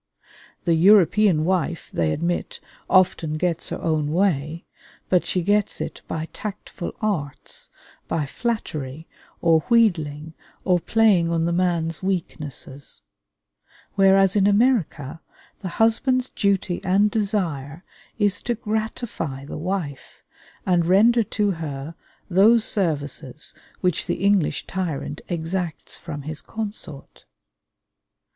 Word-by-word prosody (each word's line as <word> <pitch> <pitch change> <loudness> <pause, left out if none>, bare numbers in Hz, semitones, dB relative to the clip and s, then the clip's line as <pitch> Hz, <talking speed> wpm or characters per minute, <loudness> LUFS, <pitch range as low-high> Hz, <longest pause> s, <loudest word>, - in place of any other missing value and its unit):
The 170 - +2
European 185 -1 +5
wife, 175 -2 -1
they 80 -2 +1
admit, 170 - -2 0.3
often 180 -4 +3
gets 170 0 -1
her - - -4
own 155 -2 0
way, 165 -3 0 0.4
but 180 -2 +2
she 180 - 0
gets 205 +2 +1
it - - -5
by 160 0 -3
tactful 200 -3 -6
arts, 155 -9 -3 0.4
by 160 -3 -1
flattery 155 - -4 0.4
or 165 -2 +5
wheedling 160 -10 +2 0.3
or 180 -2 +3
playing 200 -4 +3
on 165 -1 +1
the 170 - +1
man's 170 -3 0
weaknesses; 150 -7 -4 0.9
whereas 195 0 +5
in 200 -1 +4
America 200 - +1 0.4
the 190 - -4
husband's 255 +3 +2
duty 195 -3 0
and 200 +3 +3
desire 175 -8 -1 0.3
is 205 -2 +1
to 240 - -1
gratify 215 - -3
the - - -7
wife, 165 -6 -4 0.4
and 175 -2 +2
render 225 +6 +5
to 205 0 0
her 155 -3 -5 0.3
those 215 +5 +5
services 150 - -2 0.3
which 180 -1 0
the 175 +1 -2
English 200 -6 +2
tyrant 165 -5 -3
exacts 170 -1 -3
from 145 -4 -7
his 155 +1 -5
consort. 205 -10 -6
175 Hz, 115 wpm, -23 LUFS, 155-205 Hz, 0.9 s, European